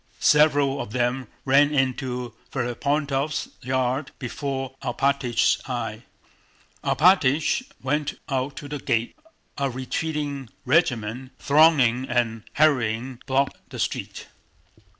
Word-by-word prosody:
Several 145 -2 +4
of 105 - -7
them 125 +1 0 0.2
ran 145 +2 +5
into 130 -3 -1 0.2
Ferapóntov's 140 +3 -1
yard 130 +2 -1
before 135 0 -4
Alpátych's 130 -1 +1
eyes. - - -3 0.8
Alpátych 165 - +3
went 145 +2 -1
out 135 0 -2
to 145 - -7
the 145 0 -5
gate. 115 -2 -1 0.4
A 140 -1 +1
retreating 140 0 -3 0.2
regiment, 130 -5 +1
thronging 140 -4 +4
and 115 -2 0
hurrying, 125 -4 +1
blocked 135 +1 +1
the - - -8
street. - - -3
135 Hz, 100 wpm, -24 LUFS, 125-145 Hz, 0.8 s, ran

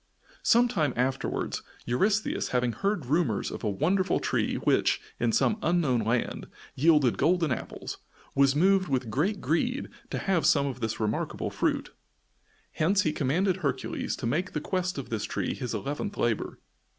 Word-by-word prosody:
Sometime 230 - +3
afterwards, 130 +2 -1 0.2
Eurystheus, 200 - +1
having 125 -1 +1
heard 195 - -1
rumors 155 +6 0
of - - -7
a 110 - +1
wonderful 180 - +1
tree - - 0
which, - - +2 0.2
in 120 -1 +2
some 220 - +2
unknown 160 -8 +2
land, 115 +2 -1 0.3
yielded 150 -4 +3
golden 165 +1 +2
apples, 120 - -5 0.3
was 140 0 +4
moved 190 +3 +4
with 130 -5 -1
great 185 - 0
greed 205 - 0 0.2
to - - -3
have 190 -4 +1
some 140 -2 +4
of 130 -3 -4
this 110 -2 -2
remarkable 110 -1 -2
fruit. - - -1 0.8
Hence 195 +6 +2
he 155 - 0
commanded 175 +8 +1
Hercules 140 -7 -2
to - - -6
make 170 +10 -1
the 150 - -1
quest 180 +2 -2
of 140 - -5
this 110 -2 -1
tree - - -2
his 125 -3 -5
eleventh 145 - -3
labor. 115 -3 -1
150 Hz, 155 wpm, -28 LUFS, 125-185 Hz, 0.8 s, was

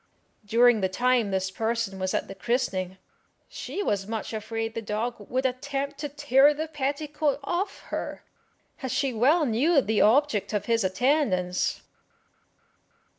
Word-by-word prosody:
During 230 +1 +4
the 190 - +1
time 245 +2 +2
this 190 -1 -1
person 225 -2 -2
was 185 0 -1
at - - -1
the - - -7
christening 190 -6 -2 0.5
she 410 - -5
was 200 - -1
much 225 0 -4
afraid 225 +1 -3
the 230 - -4
dog 215 0 -4
would 260 +1 -1
attempt 275 +2 -2
to 295 - -3
tear 290 0 +4
the 315 +2 -3
petticoat 295 0 -1
off 355 +7 -2
her, - - -4 0.6
as 260 -3 -3
she 265 0 0
well 290 +9 +3
knew 280 +7 +3
the 220 -5 +1
object 225 -2 +3
of 205 -1 -1
his 230 -2 +1
attendance. 190 -3 +1
240 Hz, 145 wpm, -26 LUFS, 210-280 Hz, 0.6 s, During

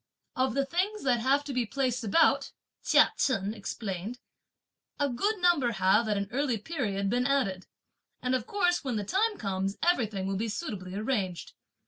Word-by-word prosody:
"Of 260 0 0
the 275 0 +1
things 380 +8 -1
that 250 -3 +2
have 270 +4 +2
to 285 -1 -5
be 250 -1 +1
placed 255 +1 -1
about," 225 +10 +3 0.3
Chia - - +5
Chen 205 -5 0
explained, 205 0 -5 0.8
a 285 - +2
good 400 - 0
number 340 -10 +3
have, 195 +4 +3
at 210 - +1
an 200 0 -2
early 260 -2 0
period, 210 -7 -2
been 245 +5 +1
added, 200 -10 0 0.5
and 250 0 -1
of 250 -3 -1
course 355 -4 +1
when 260 -4 -2
the 210 - -1
time 410 - +1
comes 195 -1 -2
everything 220 - +1
will 195 0 -1
be 225 +3 -2
suitably 200 - -5
arranged. 205 -5 -2
245 Hz, 170 wpm, -29 LUFS, 200-280 Hz, 0.8 s, Chia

